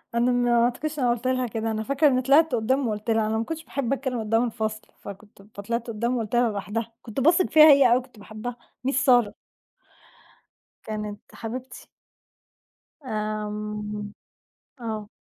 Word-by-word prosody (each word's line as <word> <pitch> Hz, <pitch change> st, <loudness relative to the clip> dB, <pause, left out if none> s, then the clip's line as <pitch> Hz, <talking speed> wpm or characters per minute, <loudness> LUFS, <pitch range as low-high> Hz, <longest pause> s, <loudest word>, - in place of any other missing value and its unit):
أنا 240 Hz, +2 st, +3 dB
ما 240 Hz, -1 st, +3 dB
أعتقدش 300 Hz, +5 st, -3 dB
إن -, -, 0 dB
أنا 240 Hz, -, +3 dB
قُلت 240 Hz, +2 st, -4 dB
لها 255 Hz, -1 st, 0 dB
كده، 225 Hz, 0 st, -3 dB
أنا 220 Hz, 0 st, -2 dB
فاكرة 280 Hz, +5 st, +2 dB
إن 255 Hz, -2 st, +2 dB
طلعت 280 Hz, +2 st, +4 dB
قُدّام 250 Hz, +3 st, +1 dB
وقُلت 215 Hz, +1 st, -4 dB
لها، 220 Hz, -1 st, +2 dB
أنا 220 Hz, +1 st, 0 dB
ما 225 Hz, -, 0 dB
كنتش 320 Hz, +4 st, -6 dB
باحب 275 Hz, -2 st, -2 dB
أتكلم 260 Hz, -3 st, -2 dB
قُدّام 225 Hz, +2 st, +1 dB
الفصل، 220 Hz, -2 st, -4 dB
فكنت 200 Hz, +1 st, -12 dB, 0.2 s
فطلعت 235 Hz, +4 st, -3 dB
قُدّام 235 Hz, +3 st, -1 dB
وقُلت 225 Hz, +1 st, -3 dB
لها 240 Hz, -1 st, +3 dB
لوحدها، 215 Hz, +3 st, -4 dB
كنت 230 Hz, +2 st, -6 dB
باثق 335 Hz, +6 st, +4 dB
فيها 310 Hz, 0 st, +8 dB
هي 275 Hz, -2 st, +6 dB
أوي 240 Hz, -, +6 dB
وكنت 250 Hz, -3 st, -9 dB
باحبها، 220 Hz, +4 st, -7 dB, 0.3 s
Miss -, -, +2 dB
سارة. 245 Hz, -6 st, +3 dB, 1.5 s
كانت 210 Hz, -1 st, -5 dB
حبيبتي. 250 Hz, +3 st, -7 dB, 1.2 s
آمم، 210 Hz, -1 st, -4 dB, 0.7 s
آه، 220 Hz, -3 st, -5 dB
235 Hz, 160 wpm, -25 LUFS, 215-255 Hz, 1.5 s, فيها